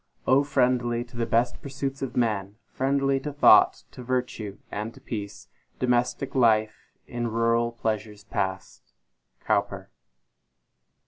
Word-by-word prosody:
friendly 125 -4 +1
to 120 0 -18
the 115 -1 -1
best 120 +1 +1
pursuits 135 0 -5
of 135 -2 -4
man, 105 -4 0 0.2
Friendly 135 0 +1
to 150 +2 -5
thought, 145 - +5
to - - -10
virtue 125 -5 -3
and 105 +2 -4
to - - -14
peace, 105 -6 -7 0.3
Domestic 125 +1 0
life 110 -4 +2
in 120 0 -3
rural 115 +1 +1
pleasures 110 -2 -4
past! 95 -1 -4 0.5
COWPER. - - -1
120 Hz, 120 wpm, -26 LUFS, 110-130 Hz, 0.5 s, thought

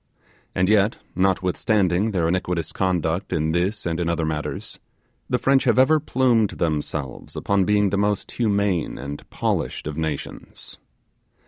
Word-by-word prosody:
And 90 0 +2
yet, 105 +1 +3 0.2
notwithstanding 95 +1 +1
their 90 -6 0
iniquitous 85 -2 -1
conduct 90 -2 -1
in 80 0 0
this 95 +5 -1
and 85 0 -1
in 85 -1 0
other 85 -1 0
matters, 75 -1 -4 0.5
the - - +2
French 135 0 +3
have - - +3
ever 155 +4 +5
plumed 120 -6 +2
themselves 75 -4 -3
upon 100 -2 +1
being 105 -1 +2
the 100 - +1
most 105 0 0
humane 100 -7 0
and 70 +2 -7
polished - - -2
of 75 0 -5
nations. 80 -3 -6
95 Hz, 140 wpm, -23 LUFS, 80-105 Hz, 0.5 s, ever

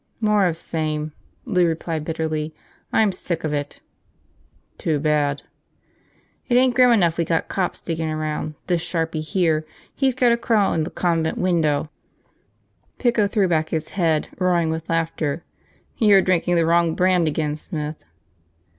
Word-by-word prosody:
"More 210 -3 +3
of 165 -2 -2
same," 155 -2 -3 0.3
Lou 180 -7 +2
replied 160 -1 -2
bitterly. 155 -1 -3 0.4
"I'm 215 -2 +3
sick 175 -2 -4
of 155 -1 -1
it." 145 0 -4 1.0
"Too 155 -2 0
bad." 145 -1 +1 1.1
"It 240 - +3
ain't 255 0 +4
grim 250 0 +5
enough 170 -7 +3
we - - +3
got 165 0 -1
cops 185 -2 -2
diggin' 160 -1 -3
around, 155 0 -3
this 175 -2 0
sharpie 165 -2 -2
here, 160 -1 +1 0.3
he's 265 -2 +1
gotta 245 -2 +3
crawl 225 -4 +2
in 160 -1 0
the - - -5
convent 165 -2 0
window!" 160 -4 +1 1.1
Pico 235 -4 +2
threw 200 -1 +1
back 160 -2 0
his 160 -1 -3
head, 165 -5 0
roaring 175 -3 +2
with 160 0 -5
laughter. 165 -2 -1 0.6
"You're 205 -4 +6
drinking 175 -1 +1
the 165 -1 +3
wrong 170 0 +2
brand 180 -2 +3
again, 150 -1 -1
Smith." 150 -1 -6
165 Hz, 145 wpm, -22 LUFS, 155-185 Hz, 1.1 s, You're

